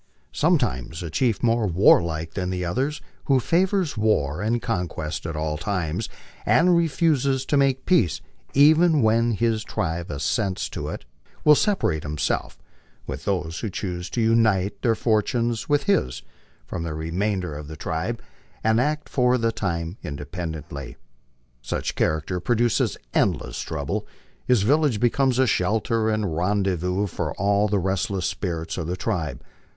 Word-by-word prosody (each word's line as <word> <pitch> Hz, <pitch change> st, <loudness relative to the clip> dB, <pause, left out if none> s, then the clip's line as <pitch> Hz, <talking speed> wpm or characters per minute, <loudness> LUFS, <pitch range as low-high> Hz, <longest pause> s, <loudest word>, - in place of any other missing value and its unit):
Sometimes 65 Hz, +7 st, 0 dB
a 85 Hz, -, -5 dB
chief 120 Hz, +2 st, 0 dB
more 115 Hz, -2 st, +2 dB
warlike 85 Hz, -3 st, +3 dB
than 90 Hz, -2 st, -2 dB
the 90 Hz, -1 st, -2 dB
others, 135 Hz, -, -1 dB, 0.2 s
who 135 Hz, -2 st, +4 dB
favors 180 Hz, -, +1 dB
war 90 Hz, -8 st, +1 dB
and 115 Hz, +3 st, +1 dB
conquest 90 Hz, -9 st, -3 dB
at 80 Hz, -, -4 dB
all 75 Hz, 0 st, -2 dB
times, 90 Hz, +1 st, -2 dB, 0.3 s
and 175 Hz, +2 st, +4 dB
refuses 145 Hz, -5 st, +2 dB
to 145 Hz, -, 0 dB
make 135 Hz, -2 st, +2 dB
peace 115 Hz, -, +3 dB, 0.4 s
even 155 Hz, +1 st, +5 dB
when 115 Hz, +2 st, +3 dB
his 110 Hz, 0 st, 0 dB
tribe 85 Hz, -3 st, -3 dB
assents 95 Hz, +6 st, -1 dB
to -, -, -5 dB
it, -, -, -7 dB, 0.4 s
will 150 Hz, -, +8 dB
separate 150 Hz, -, +1 dB
himself, 75 Hz, -3 st, -2 dB, 0.5 s
with -, -, -6 dB
those 85 Hz, -4 st, -1 dB
who 110 Hz, -, -3 dB
choose 90 Hz, -2 st, -4 dB
to 120 Hz, -, -1 dB
unite 110 Hz, -4 st, +2 dB
their 115 Hz, -3 st, +2 dB
fortunes 115 Hz, +2 st, 0 dB
with 145 Hz, -1 st, +3 dB
his, 65 Hz, -, 0 dB, 0.4 s
from 90 Hz, -, -5 dB
the 80 Hz, -2 st, -4 dB
remainder 90 Hz, +2 st, -2 dB
of 75 Hz, 0 st, -7 dB
tho 80 Hz, -, -8 dB
tribe, 85 Hz, +10 st, -3 dB, 0.4 s
and 110 Hz, +2 st, +3 dB
act 150 Hz, +2 st, -1 dB
for 125 Hz, -1 st, +2 dB
the 115 Hz, -1 st, +1 dB
time 85 Hz, -3 st, -3 dB
independently. 75 Hz, -2 st, -6 dB, 0.6 s
Such -, -, -2 dB
a -, -, -18 dB
character 80 Hz, +4 st, 0 dB
produces 120 Hz, +4 st, +1 dB, 0.2 s
endless -, -, 0 dB
trou 70 Hz, -3 st, -4 dB
ble; -, -, -3 dB, 0.4 s
his 125 Hz, -6 st, +4 dB
village 140 Hz, -1 st, +2 dB
becomes 125 Hz, +2 st, +2 dB
a 130 Hz, -, +4 dB
shelter 110 Hz, +2 st, +1 dB
and 105 Hz, -6 st, -1 dB
rendezvous 95 Hz, +1 st, 0 dB
for 95 Hz, -, -4 dB
all 100 Hz, +2 st, +2 dB
the 105 Hz, 0 st, +1 dB
restless 95 Hz, 0 st, -1 dB
spirits 85 Hz, -3 st, -3 dB
of 80 Hz, -, -3 dB
the 90 Hz, +1 st, -2 dB
tribe. 80 Hz, -8 st, -3 dB
100 Hz, 150 wpm, -24 LUFS, 85-120 Hz, 0.6 s, will